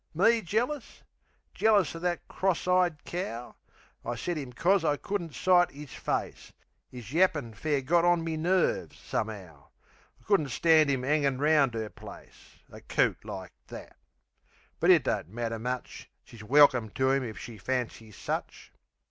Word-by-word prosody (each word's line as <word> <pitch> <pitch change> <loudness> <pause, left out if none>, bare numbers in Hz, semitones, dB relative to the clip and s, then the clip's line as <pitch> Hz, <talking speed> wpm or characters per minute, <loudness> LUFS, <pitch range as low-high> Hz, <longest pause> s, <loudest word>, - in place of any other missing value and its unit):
Me 225 +6 +4
jealous? 240 - -3 0.5
Jealous 210 -5 +3
of 165 - -8
that 175 -1 -2
cross 190 -2 -1
eyed 180 -4 +2
cow! 125 -10 -5 0.5
I 120 - -3
set 175 +9 -3
'im 140 -5 -6
'cos 180 +8 +2
I 150 -2 +1
couldn't 175 -5 -4
sight 180 -1 +4
'is 145 -4 -11
face. - - -4 0.4
'Is 125 0 -10
yappin' 155 -9 +2
fair 145 +6 -1
got 170 +6 +2
on 175 -1 +3
me 165 -1 -3
nerves, 190 - 0
some'ow. - - -5 0.5
I - - -26
couldn't 195 -9 +1
stand 155 +2 +4
'im 135 -2 0
'angin' 140 -2 +1
round 145 -4 +3
'er 110 -1 -3
place. - - -14
A - - -12
coot - - 0
like 95 -2 -7 0.2
that!...But - - -8
it - - +7
don't - - -2
matter 115 +1 -4
much, 125 +2 -5
She's 115 - -14
welkim 125 -2 +5
to 130 0 +2
'im 135 -1 +1
if 110 -3 -6
she 115 -3 -9
fancies 115 -3 -4
such. - - -5
150 Hz, 155 wpm, -28 LUFS, 125-175 Hz, 0.5 s, it